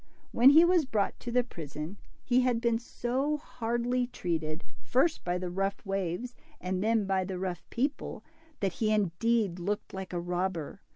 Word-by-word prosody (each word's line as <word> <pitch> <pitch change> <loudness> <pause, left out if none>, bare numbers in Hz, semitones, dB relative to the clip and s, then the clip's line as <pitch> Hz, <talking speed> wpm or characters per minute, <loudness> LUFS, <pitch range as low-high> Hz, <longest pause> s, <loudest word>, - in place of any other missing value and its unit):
When 245 +3 +7
he 320 +4 +8
was 345 -3 +4
brought 210 -6 0
to 240 - -5
the 250 +1 +3
prison, 160 - -7 0.3
he 250 0 +3
had 250 -2 +2
been 235 -1 +2
so 260 +5 -1
hardly 245 -2 -1
treated, 165 -8 -3 0.2
first 305 +6 +2
by 175 0 0
the 180 -1 -4
rough 195 +3 -2
waves 195 +4 -2 0.3
and 185 +1 -2
then 220 -1 +2
by 190 -1 +1
the 185 0 -4
rough 180 -1 -3
people, 275 +5 -2 0.4
that 195 -3 +1
he 215 -1 0
indeed 210 0 +1
looked 205 +4 -3
like 190 -1 -5
a 175 - -1
robber. 175 -1 -2
205 Hz, 170 wpm, -30 LUFS, 180-245 Hz, 0.4 s, he